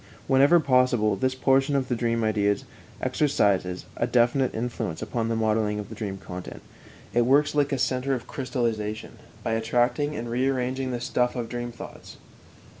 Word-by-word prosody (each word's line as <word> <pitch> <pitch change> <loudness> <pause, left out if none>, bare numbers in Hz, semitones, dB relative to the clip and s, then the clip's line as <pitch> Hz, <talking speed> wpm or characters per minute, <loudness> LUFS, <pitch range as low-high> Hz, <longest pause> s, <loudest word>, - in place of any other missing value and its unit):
Whenever 140 +6 +5
possible, 125 -7 +3
this 130 +6 0
portion 135 +2 +2
of 135 -2 0
the 125 - 0
dream 115 -1 0
ideas 105 -2 +1 0.4
exercises 100 -11 +1
a 120 - 0
definite 125 +2 +2
influence 110 -6 -3
upon 115 -2 -2
the 115 - 0
modelling 110 -1 +1
of 105 -1 -6
the - - -7
dream 100 -3 -4
content; 90 -1 -8 0.5
it 120 - +4
works 140 +5 +3
like 145 -1 +1
a 135 - +1
center 130 +1 0
of 125 - -6
crystallization, 115 -5 -3 0.2
by - - -1
attracting 120 +6 +1
and 120 - -4
rearranging 130 +1 -1
the 125 -1 -2
stuff 125 0 0
of 120 -2 -2
the - - -13
dream 120 0 -4
thoughts. 120 - -11
120 Hz, 170 wpm, -26 LUFS, 110-130 Hz, 0.5 s, Whenever